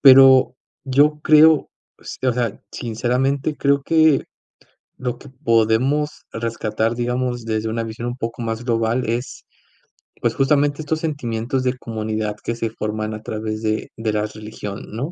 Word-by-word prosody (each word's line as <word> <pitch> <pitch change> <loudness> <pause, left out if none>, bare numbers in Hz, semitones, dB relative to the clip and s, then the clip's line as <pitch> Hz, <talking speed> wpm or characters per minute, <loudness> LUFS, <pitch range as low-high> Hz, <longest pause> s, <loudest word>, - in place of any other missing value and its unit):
Pero 130 -2 +8 0.3
yo 145 +3 +3
creo 155 0 +6 0.3
s - - -8
o - - +3
sea, 115 -3 -2
sinceramente, 130 +5 -1
creo 140 0 +2
que 160 -1 +4 0.8
lo 125 -1 -3
que 140 - -13
podemos 130 +3 +2 0.2
rescatar, 115 -1 -1
digamos, 125 0 -1
desde 110 0 -2
una 115 +1 -2
visión 115 +1 -5
un 120 +1 -4
poco 115 0 -4
más 115 0 -3
global 115 +1 +1
es, 120 +3 -4 0.8
pues, 115 - +1
justamente 145 +2 +2
estos 155 +1 -2
sentimientos 130 -4 -2
de 125 0 0
comunidad 110 -2 -3
que 115 - -3
se 115 -1 -2
forman 110 -1 -3
a 110 - -8
través 110 0 -4
de 110 -1 -1
de 110 -1 -1
las 105 0 -1
religión, 105 -2 -7
¿no? 135 +9 -3
120 Hz, 150 wpm, -21 LUFS, 110-135 Hz, 0.8 s, Pero